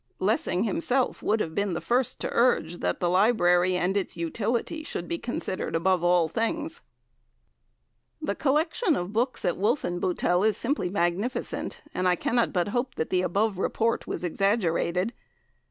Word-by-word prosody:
Lessing 195 -1 +1
himself 270 -1 0
would 220 +1 +1
have 160 - -3
been 200 -2 -1
the - - -1
first 245 0 0
to - - -2
urge 175 -9 +2
that - - -1
the 175 - +1
library 180 -2 +3
and 180 +2 0
its 195 -3 -2
utility 230 - -2
should 175 - -5
be 170 - -3
considered 235 -8 -3
above 180 +1 +2
all 175 -1 +4
things." 310 - -2 1.4
The 305 - -2
collection 310 - +1
of 180 +3 -4
books 240 0 0
at 175 - +1
Wolfenbuttel 180 -4 +1
is 220 -1 +3
simply 245 -7 -1
magnificent, 195 +6 -2
and 185 - 0
I 180 - +4
cannot 235 +6 +1
but 180 +1 0
hope 245 +3 -2
the 180 +3 0
above 195 +2 0
report 230 +3 0
was - - -3
exaggerated. 185 +1 +1
200 Hz, 155 wpm, -27 LUFS, 175-240 Hz, 1.4 s, all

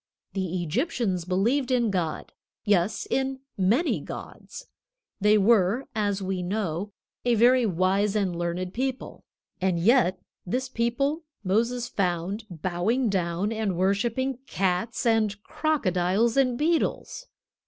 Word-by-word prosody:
The 185 -2 -2
Egyptians 195 - -1
believed 235 +9 +1
in 240 -4 +2
God; 175 -5 -2 0.3
yes, 205 +1 +1
in 265 0 -1
many 225 - +2
gods. - - -9 0.5
They 210 +1 +5
were, 210 +3 +3
as 205 -2 -1
we 190 -1 -2
know, 190 0 -2 0.3
a 245 -1 +3
very 240 +2 +5
wise 195 +3 +1
and 195 -4 0
learned 175 +2 -3
people. 260 +1 -4 0.4
And 185 -2 +1
yet 190 -2 +3 0.2
this 255 +8 -2
people 265 +6 0 0.2
Moses 235 +5 0
found 190 +1 -2
bowing 185 - 0
down 185 +1 -1
and 215 -5 -1
worshiping 235 +7 0
cats 195 +6 -1
and 220 -3 +2
crocodiles 220 - +1
and 255 -3 +2
beetles. 335 - -1
210 Hz, 120 wpm, -26 LUFS, 185-245 Hz, 0.5 s, They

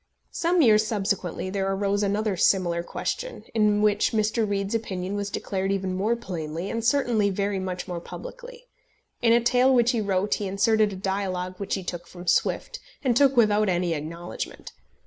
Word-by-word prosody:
Some 345 0 +2
years 215 -3 +5
subsequently 195 -4 -2
there 195 0 -1
arose 200 +1 0
another 205 0 0
similar 175 -2 +2
question, - - -4
in 210 -2 +3
which 210 +2 +2
Mr. 220 0 +1
Reade's 200 0 -1
opinion 190 -4 -3
was 200 0 -2
declared 195 -1 -2
even 190 -1 -1
more 205 +5 +1
plainly, 170 -5 -5
and 230 0 -3
certainly 235 -5 +2
very 200 0 -1
much 185 -1 -4
more 175 -2 -4
publicly. 480 - -10 0.6
In 235 -2 +4
a 235 - +6
tale 250 +2 +3
which 245 -2 +4
he 235 -4 0
wrote 200 0 0
he 205 - -2
inserted 210 +2 +2
a - - -6
dialogue 185 -1 -3
which 200 - -2
he 190 - -5
took 175 -1 -6
from 175 0 -11
Swift, - - 0 0.2
and 250 -4 +2
took 275 0 +4
without 210 -2 +4
any 175 -1 +1
acknowledgment. 165 +3 -6
200 Hz, 175 wpm, -25 LUFS, 185-225 Hz, 0.6 s, a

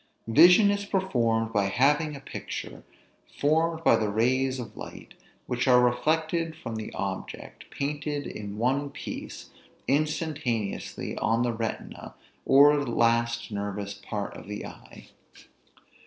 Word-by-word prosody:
Vision 180 - +7
is 200 0 -1
performed 120 - 0
by 100 -2 +2
having 145 +8 +2
a - - -8
picture, 135 - -7 0.6
formed 160 +2 +1
by 115 - +6
the 110 -2 0
rays 130 +5 +1
of 120 - -7
light - - -10 0.3
which 125 +1 -1
are 125 -1 +7
reflected 160 +6 +1
from 115 -7 -6
the 110 -1 -5
object, 95 -1 -6
painted 145 0 -3
in 105 -1 -7
one 135 +5 0
piece, 140 - -8 0.4
instantaneously, 145 -7 -2
on 115 +2 +1
the 120 -1 0
retina, 115 0 -5 0.3
or 145 +2 +6
last 115 -1 +1
nervous 100 0 -4
part 100 0 -5
of - - -11
the 105 0 -5
eye. - - -13
125 Hz, 125 wpm, -27 LUFS, 115-150 Hz, 0.6 s, Vision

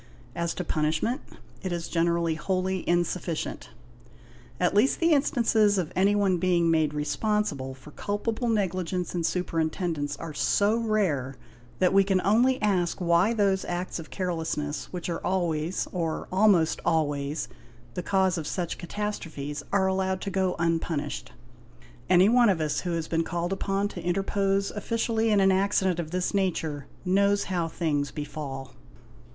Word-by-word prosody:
As 170 -1 -2
to 180 - -3
punishment, 160 - 0 0.4
it 185 - -3
is 170 -1 -3
generally 170 -1 +1
wholly 185 +3 -1
insufficient; 175 -1 -1 0.9
at - - +2
least 210 +7 +3
the 335 0 +3
instances 230 -8 +3
of 175 -5 -2
anyone 195 -1 +3
being 170 -2 +2
made 160 -2 +2
responsible 150 -4 -1
for 135 +3 -14
culpable 220 - -2
negligence 185 -4 -1
in 175 -2 -1
superintendence 160 -3 -1
are 165 -2 -7
so 205 +8 +2
rare, 190 - 0 0.4
that 185 +1 +3
we 195 0 +6
can 190 -1 +2
only 245 +7 +3
ask 185 -5 +1
why 175 +4 +3
those 200 -4 +2
acts 175 0 -3
of 155 - -9
carelessness 160 -5 -3
which 180 -2 -5
are 170 -2 -3
always, 175 -2 -1
or 165 -3 -2
almost 185 -4 +4
always, 145 -2 0 0.5
the 180 - -3
cause 190 -1 +1
of 155 - -5
such 175 -3 -3
catastrophes 165 -6 -4
are 195 -1 +3
allowed 190 0 0
to 200 - -3
go 190 -2 0
unpunished. 165 -5 -1 0.8
Any 185 +1 +6
one 240 0 +5
of 185 -4 +2
us 155 -2 0
who 175 -2 -3
has 165 -1 -2
been 165 0 +1
called 175 +2 -2
upon 195 +1 -1
to 180 - -7
interpose 195 +2 0
officially 225 +1 0
in 210 -2 +4
an 195 0 +5
accident 190 -2 +2
of 160 -3 -3
this 180 +3 -1
nature, 160 -7 -1 0.2
knows 200 +2 +3
how 175 -3 -1
things 150 -4 -1
befall. 140 -3 -6
180 Hz, 150 wpm, -27 LUFS, 165-200 Hz, 0.9 s, we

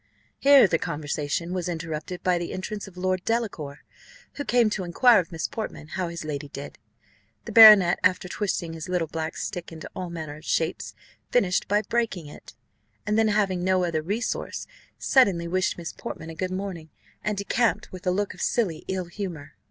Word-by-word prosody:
Here 280 -2 +7
the 165 -4 +1
conversation 150 +3 -3
was 180 -1 -2
interrupted 165 +1 -5
by 180 -1 +2
the 170 - -4
entrance 205 +2 -5
of 185 -2 -14
Lord 185 0 -1
Delacour, 200 -12 -2 0.5
who 285 - -4
came 240 -4 +3
to 195 - -2
inquire 230 +8 +5
of 175 -2 -4
Miss 165 -2 -2
Portman 215 -8 -6
how 185 +1 -2
his 170 -2 -6
lady 145 -1 -4
did. 140 0 -9 0.7
The - - -6
baronet, 210 -6 +9
after 185 0 +2
twisting 180 -4 -2
his 165 +2 -7
little 180 -3 0
black 160 0 -4
stick 175 -4 -5
into 160 -1 -8
all 180 -1 -4
manner 160 -3 -6
of 155 - -15
shapes, 165 +1 -1 0.3
finished 190 -7 +2
by 205 +1 +2
breaking 220 -6 -1
it, 145 -5 -13 0.5
and 210 - 0
then 220 0 +4
having 200 -4 +1
no 185 0 +2
other 165 -3 0
resource, 205 +9 -3 0.3
suddenly 195 -11 +3
wished 185 +2 0
Miss 170 -2 -6
Portman 160 0 -7
a - - -8
good 185 +2 -2
morning, 185 -4 -5 0.3
and 210 -1 -1
decamped 220 +3 0
with 185 0 -8
a - - +4
look 200 +2 -1
of - - -11
silly 185 -10 0
ill 185 -1 -2
humour. 175 -5 -6
180 Hz, 185 wpm, -25 LUFS, 165-205 Hz, 0.7 s, baronet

